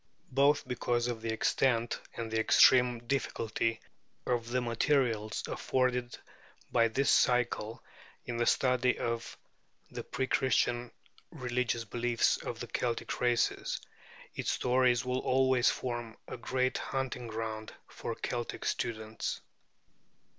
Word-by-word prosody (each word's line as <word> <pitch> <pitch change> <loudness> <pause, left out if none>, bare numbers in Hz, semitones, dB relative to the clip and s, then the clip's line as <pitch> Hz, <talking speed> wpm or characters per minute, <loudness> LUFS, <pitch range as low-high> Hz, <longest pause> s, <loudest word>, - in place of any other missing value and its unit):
Both 140 +3 +3
because 120 -1 0
of 120 -2 -3
the 115 0 -2
extent 115 +1 +1 0.2
and 115 -1 -4
the 110 - +1
extreme 125 +1 +5
difficulty 115 -3 -1 0.5
of 120 -2 -1
the 125 +1 +1
materials 115 -3 +1
afforded 125 -1 -1 0.5
by 115 -1 +4
this 135 +5 +1
cycle 120 -3 +2 0.4
in 120 -1 -4
the 120 - +1
study 125 -1 +3
of 115 -1 -3 0.5
the - - -5
pre 130 +1 -2
Christian 120 -1 +1 0.4
religious 125 -2 -2
beliefs 120 +2 +1
of 115 - -6
the - - -3
Celtic 120 0 -2
races, 120 -2 +1 0.5
its - - -3
stories 125 -1 +2
will 125 0 0
always 130 -1 +3
form 120 -2 -4
a - - -5
great 130 +1 -1
hunting 130 -3 -3
ground 110 -1 -4 0.2
for - - -5
Celtic 120 -1 -4
students. 110 -1 -3
120 Hz, 120 wpm, -31 LUFS, 115-125 Hz, 0.5 s, extreme